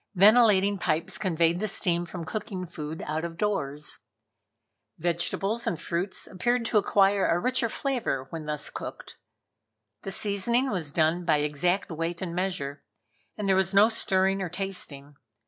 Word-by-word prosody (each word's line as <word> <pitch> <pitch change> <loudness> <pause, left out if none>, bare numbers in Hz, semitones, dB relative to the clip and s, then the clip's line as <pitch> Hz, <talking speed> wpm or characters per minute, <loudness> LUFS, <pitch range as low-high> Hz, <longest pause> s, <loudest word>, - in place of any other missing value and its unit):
Ventilating 205 -1 +5
pipes 165 -2 -1
conveyed 170 -3 +1
the 215 - -1
steam 175 -3 +1
from 170 -1 -6
cooking 205 -2 -4
food 160 -2 -6
out 155 +2 -2
of 165 -1 -5
doors. 150 -8 -2 1.0
Vegetables 195 +7 -1
and 170 -7 -1
fruits 175 +4 -3
appeared 240 +5 0
to 225 -2 +3
acquire 200 -1 +3
a 170 - +2
richer 250 +4 0
flavor 235 - -2
when 160 -2 -6
thus 150 -1 -1
cooked. - - -7 0.8
The - - -6
seasoning 215 +7 +1
was 165 -7 -2
done 160 +3 +2
by 160 -3 +3
exact 170 +6 0
weight 165 +2 -3
and 180 -3 -4
measure, 170 -6 -3 0.5
and 210 -2 -2
there 190 - +4
was 190 +1 +1
no 205 +3 +7
stirring 195 -3 +1
or 185 - -2
tasting. 160 -7 -5
185 Hz, 150 wpm, -27 LUFS, 165-205 Hz, 1.0 s, no